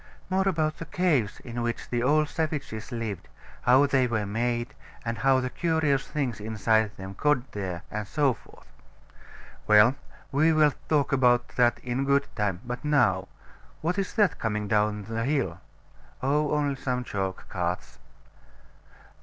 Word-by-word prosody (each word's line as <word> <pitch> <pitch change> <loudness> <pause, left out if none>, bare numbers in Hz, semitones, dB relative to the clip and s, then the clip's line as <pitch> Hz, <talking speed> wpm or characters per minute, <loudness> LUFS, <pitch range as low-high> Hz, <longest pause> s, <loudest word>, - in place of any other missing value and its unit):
More 190 +1 +2
about 155 -3 0
the 165 - -5
caves 150 - +1
in 120 -1 -5
which 120 -1 -3
the 120 -1 0
old 150 +4 +3
savages 145 -9 -3
lived, 115 -6 -4 0.3
how 130 +3 +5
they 135 -3 +2
were 110 -3 -1
made, 120 +4 -1 0.3
and 115 0 -3
how 135 -1 +4
the 125 -1 -3
curious 160 -5 +1
things 135 -7 -2
inside 110 0 +1
them 95 0 -7
got 135 +3 +1
there, 95 -4 -4
and 105 -1 -4
so 140 0 +2
forth. - - -18 1.0
Well, 105 +3 +7 0.4
we 155 +4 +4
will 155 -2 +4 0.2
talk 150 -3 +2
about 125 -2 +3
that 120 -1 +2
in 125 +2 -1
good 140 0 +3
time: 105 -5 -1
but 125 +3 -5
now 100 -11 +2 0.5
What 175 +5 0
is 195 - -3
that 210 -5 +2
coming 105 -2 -2
down 105 0 +1
the 115 +2 -3
hill? 120 - -1 0.6
Oh, 145 +2 +2
only 145 -2 0
some 125 -2 -2
chalk 95 -5 -4
carts. 90 -1 -3
125 Hz, 155 wpm, -27 LUFS, 105-145 Hz, 1.0 s, Well